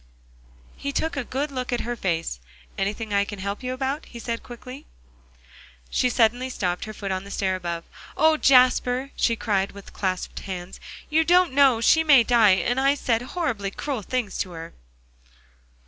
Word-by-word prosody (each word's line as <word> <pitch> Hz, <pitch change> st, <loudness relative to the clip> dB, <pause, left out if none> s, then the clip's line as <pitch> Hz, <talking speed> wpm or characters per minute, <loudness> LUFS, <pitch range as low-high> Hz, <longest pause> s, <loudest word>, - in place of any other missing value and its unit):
He 280 Hz, -, -3 dB
took 320 Hz, +3 st, -1 dB
a 275 Hz, -, -2 dB
good 280 Hz, +4 st, -3 dB
look 255 Hz, -2 st, -4 dB
at 245 Hz, -, 0 dB
her 240 Hz, +1 st, -3 dB
face. 165 Hz, -, -2 dB, 0.4 s
"Anything 205 Hz, +2 st, -3 dB
I 200 Hz, 0 st, +3 dB
can 205 Hz, 0 st, -7 dB
help 200 Hz, +1 st, -4 dB
you 255 Hz, 0 st, -3 dB
about?" 270 Hz, +4 st, -3 dB
he 240 Hz, -, -11 dB
asked 230 Hz, -1 st, -2 dB
quickly. 255 Hz, +3 st, -10 dB, 1.0 s
She 250 Hz, -, +2 dB
suddenly 245 Hz, +2 st, +2 dB
stopped, 180 Hz, -7 st, -2 dB
her 215 Hz, -, -7 dB
foot 200 Hz, -2 st, -5 dB
on 185 Hz, 0 st, -2 dB
the 200 Hz, -, -11 dB
stair 190 Hz, -1 st, -1 dB
above. 170 Hz, -2 st, -4 dB, 0.3 s
"Oh, 315 Hz, 0 st, +5 dB
Jasper!" 255 Hz, -1 st, +4 dB
she 230 Hz, -, +2 dB
cried, 200 Hz, -3 st, -1 dB
with 200 Hz, -1 st, -12 dB
clasped 185 Hz, -2 st, -3 dB
hands, 185 Hz, -1 st, -7 dB, 0.3 s
"you 320 Hz, +1 st, +4 dB
don't 350 Hz, -2 st, +4 dB
know 265 Hz, -4 st, +5 dB
she 320 Hz, +7 st, +5 dB
may 280 Hz, -6 st, +7 dB
die, 225 Hz, -5 st, +5 dB
and 240 Hz, +8 st, 0 dB
I 275 Hz, +1 st, +3 dB
said 235 Hz, -5 st, 0 dB
horribly 250 Hz, -, -2 dB
cruel 260 Hz, +4 st, -4 dB
things 235 Hz, -1 st, -3 dB
to 180 Hz, -, -3 dB
her." 165 Hz, 0 st, -8 dB
235 Hz, 180 wpm, -24 LUFS, 195-265 Hz, 1.0 s, may